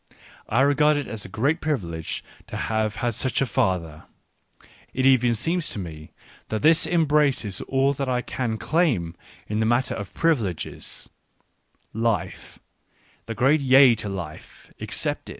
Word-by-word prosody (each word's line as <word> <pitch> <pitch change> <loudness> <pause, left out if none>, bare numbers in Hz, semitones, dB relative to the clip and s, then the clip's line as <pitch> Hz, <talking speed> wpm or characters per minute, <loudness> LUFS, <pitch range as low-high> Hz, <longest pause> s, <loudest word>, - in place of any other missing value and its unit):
I 115 +4 +3
regard 145 +2 +4
it 145 - -2
as 110 -4 -6
a - - -9
great 140 - 0
privilege 85 - -3 0.2
to - - -6
have 110 -1 -1
had 120 - +1
such 130 +3 0
a 135 - +2
father: 85 -9 -1 0.9
it 130 - +1
even 125 -3 +4
seems 165 +7 -1
to - - -4
me 80 -5 -8 0.4
that 110 +3 -3
this 160 +2 +5
embraces 150 - +1
all 135 +1 +2
that 135 -1 -3
I 125 -1 0
can 115 -4 -3
claim 120 - 0 0.3
in 105 +1 -2
the 110 - +2
matter 120 +2 +1
of 100 -3 -6
privileges 115 - -2 0.4
— - - -44 0.2
life, 95 -4 -4 0.7
the 115 - -4
great 135 +6 +3
yea 135 -1 +7
to 105 - -4
life, 85 -5 -8
excepted. - - -3
120 Hz, 150 wpm, -24 LUFS, 100-140 Hz, 0.9 s, yea